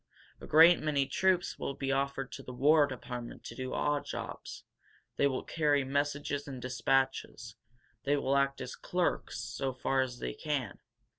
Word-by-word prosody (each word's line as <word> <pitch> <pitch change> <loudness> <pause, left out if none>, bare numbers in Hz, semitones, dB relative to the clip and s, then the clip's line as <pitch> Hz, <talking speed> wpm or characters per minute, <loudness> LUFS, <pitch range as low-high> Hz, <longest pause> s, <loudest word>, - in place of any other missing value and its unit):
A - - -9
great 165 +3 +7
many 145 -3 +1
troops 185 +3 +1
will 140 - -3
be 135 -1 -2
offered 135 0 -1
to - - -7
the 125 -2 -9
War 145 +3 +5
Department 125 -3 -7
to - - -7
do 130 -1 -4
odd 145 -1 +1
jobs. - - -7 0.5
They 140 - +4
will 130 -2 -2
carry 145 -3 +1
messages 145 +1 -1
and 135 -2 -6
dispatches. 125 -2 -1 0.5
They 145 +1 +2
will 140 0 +1
act 140 0 +1
as 130 0 -5
clerks, 175 -8 -1
so 125 +3 -3
far 130 +1 +1
as 125 -2 -3
they 60 - -4
can. 140 - -3
135 Hz, 165 wpm, -31 LUFS, 130-145 Hz, 0.5 s, great